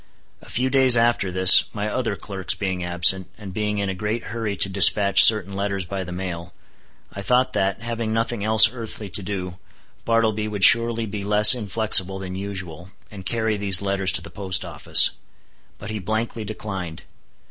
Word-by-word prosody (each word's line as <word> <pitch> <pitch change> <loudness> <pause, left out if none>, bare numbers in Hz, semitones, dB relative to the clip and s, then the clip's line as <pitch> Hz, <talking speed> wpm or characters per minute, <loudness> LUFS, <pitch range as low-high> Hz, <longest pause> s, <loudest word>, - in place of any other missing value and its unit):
A - - -17
few 130 +2 -3
days 130 -2 +3
after 115 -5 0
this, 95 +1 +7
my 105 0 -4
other 115 -1 -4
clerks 95 -2 -4
being 95 -3 -5
absent, 90 +1 +2
and 100 -4 -11
being 105 +1 -4
in 100 -1 -3
a 95 - -4
great 105 +4 -5
hurry 110 -3 -4
to 95 - -1
dispatch 100 +1 +5
certain 105 -3 +4
letters 100 -1 -4
by 95 +2 -6
the 90 - -10
mail, 90 -2 -8 0.6
I 100 - -8
thought 125 +4 0
that, 95 +2 -2
having 115 -1 -5
nothing 115 -1 -3
else 110 +1 +5
earthly 110 -4 -7
to 95 - -3
do, 90 -2 -7 0.4
Bartleby 110 -2 -1
would 105 -2 -5
surely 115 +1 +5
be 105 -1 -7
less 105 +3 +6
inflexible 105 -4 +1
than 95 -1 -8
usual, 95 -3 -8 0.2
and 95 -3 -10
carry 110 -2 -2
these 100 -2 +3
letters 100 -1 0
to 85 - -2
the - - -12
post 95 -3 -2
office. - - +2 0.7
But 105 +1 -9
he 110 - -6
blankly 110 +3 -5
declined. 95 -6 -8
100 Hz, 180 wpm, -20 LUFS, 95-110 Hz, 0.7 s, this